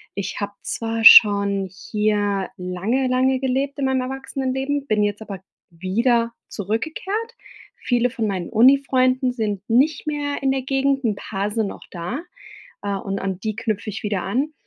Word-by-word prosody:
Ich 195 -1 -4
habe 200 0 -3
zwar 225 0 -3
schon 200 -2 +7
hier 205 -1 -1
lange, 190 +9 -1
lange 255 +1 +2
gelebt 270 +2 -1
in 275 - 0
meinem 265 -1 +1
Erwachsenenleben, 265 +1 -3
bin 215 -1 +1
jetzt 205 +1 -2
aber 195 -3 -8 0.3
wieder 230 +7 0 0.2
zurückgekehrt. 320 - -3 0.4
Viele 245 0 0
von 230 -2 -3
meinen 185 -4 -3
Uni-Freunden 255 +1 +3
sind 210 -5 -2
nicht 275 +8 +2
mehr 290 -1 -2
in 270 - +2
der 270 0 -1
Gegend, 270 0 0
'n 215 -3 +1
paar 200 0 -4
sind 220 -1 -1
noch - - -9
da, 180 - -4 0.6
äh, 200 -1 -1
und 195 0 -4
an 190 -2 -3
die 215 0 -2
knüpfe 220 -2 -3
ich 210 - -6
wieder 205 -3 -1
an. 270 +10 -1
230 Hz, 160 wpm, -22 LUFS, 200-265 Hz, 0.6 s, schon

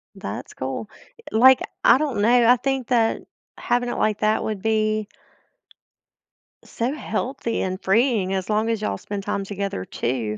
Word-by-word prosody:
That's - - -7
cool. 135 +11 -5 0.4
I - - -5
Like, 260 +2 +7 0.2
I - - +7
don't 270 -8 -1
know, 235 +2 +4
I 250 - +8
think 270 -1 -2
that 230 -3 +2 0.4
having 245 0 0
it - - -3
like 215 -1 +1
that 215 0 +1
would 210 -3 -3
be 215 -1 0 1.6
so 245 +4 -3
healthy 260 -5 -3
and 185 +1 -3
freeing 210 -2 +2
as 190 +2 -3
long 215 +2 +1
as 225 -2 -1
y'all 100 - -2
spend 200 - -6
time 200 -1 -2
together 195 - -4
too, 115 -4 -3
215 Hz, 160 wpm, -23 LUFS, 195-240 Hz, 1.6 s, I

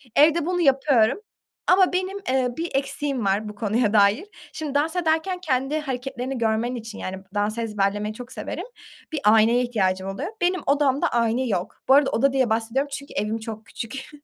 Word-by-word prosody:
Evde 305 +2 +5
bunu 355 +1 0
yapıyorum 270 - +3 0.5
ama 365 0 +5
benim, 375 +2 -1
eee, 260 -1 +2
bir 335 +1 -2
eksiğim 275 -3 -1
var 200 +2 0
bu 210 - -9
konuya 215 +1 0
dair. 210 - +4 0.3
Şimdi 305 -3 -5
dans 310 +4 +1
ederken 350 +2 0
kendi 275 -2 0
hareketlerini 265 -2 -4
görmen 230 +2 0
için, 225 -2 -7
yani, 185 +1 -4
b - - -18
dans 205 +2 0
ezberlemeyi 210 -2 -1
çok 245 +3 -10
severim, - - -5 0.5
bir 315 - -2
aynaya 225 +3 +5
ihtiyacım 190 -6 0
oluyor. 265 - -4
Benim 360 +1 +1
odamda 280 -1 +2
ayna 235 +2 +1
yok. 180 -4 -3
Bu - - +8
arada 280 0 +5
oda 275 +3 +2
diye 260 -3 +2
bahsediyorum 230 +6 0
çünkü 280 0 -7
evim 215 +2 -1
çok 220 -1 -7
küçük. 265 +6 -7
250 Hz, 175 wpm, -24 LUFS, 220-290 Hz, 0.5 s, Bu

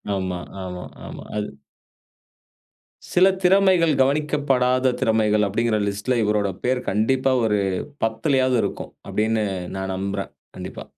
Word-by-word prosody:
ஆமா 95 -2 -3 0.2
ஆமா 90 -1 -6 0.2
ஆமா. - - -8
அது 105 - -2 1.6
சில 185 +2 +5
திறமைகள், 185 -3 +4
கவனிக்கப்படாத 135 -3 +2
திறமைகள் 105 -2 +2
அப்டிங்கிற 110 +2 0
லிஸ்ட்ல, 105 +5 -1
இவரோட 105 -1 +1 0.2
பேர் 125 0 +1
கண்டிப்பா 130 +6 +1
ஒரு 105 -2 +2 0.5
10லையாவது 130 +3 +1
இருக்கும். - - -5 0.2
அப்டின்னு 110 0 0 0.3
நான் 95 0 -3
நம்புறேன். 100 +1 -3 0.3
கண்டிப்பா. - - -7
115 Hz, 110 wpm, -22 LUFS, 105-135 Hz, 1.6 s, சில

